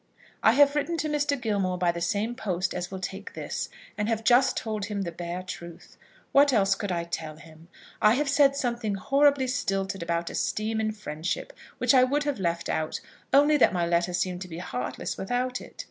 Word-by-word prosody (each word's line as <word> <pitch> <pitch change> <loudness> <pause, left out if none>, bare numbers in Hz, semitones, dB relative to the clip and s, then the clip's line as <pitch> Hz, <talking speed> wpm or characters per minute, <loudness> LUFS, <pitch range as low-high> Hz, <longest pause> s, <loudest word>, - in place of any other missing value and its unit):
I 220 - +5
have 285 +2 +5
written 335 +3 0
to 310 0 -1
Mr. 290 -2 0
Gilmore 200 -6 0
by 175 -1 +2
the 170 0 -6
same 205 +7 0
post 185 -7 -2
as 180 -1 -4
will 190 - -6
take 195 +2 -6
this, - - -4 0.3
and 210 +1 0
have 225 -1 -1
just 245 +3 +4
told 215 -3 -2
him 205 -2 -3
the 170 - -4
bare 175 +2 -5
truth. 170 -2 -9 0.4
What 285 0 +6
else 200 -5 +3
could 200 -1 -4
I 170 -1 -1
tell 160 -2 -5
him? 160 +1 -15 0.3
I 215 +2 +6
have 295 +2 0
said 280 0 +4
something 235 -6 -1
horribly 280 +5 +3
stilted 195 -8 -2
about 170 0 -2
esteem 220 +1 -1
and 215 0 -1
friendship, 175 - -4 0.2
which - - +3
I 255 -1 +7
would 285 +3 +1
have 285 -6 -2
left 170 -2 -1
out, 155 0 -2 0.3
only 290 +2 +5
that 260 - +4
my 175 -2 +1
letter 170 +1 +1
seemed 180 0 -2
to 185 - -5
be 165 -2 -8
heartless 125 -8 -4
without 250 +5 -2
it. - - -14
205 Hz, 205 wpm, -27 LUFS, 175-255 Hz, 0.4 s, I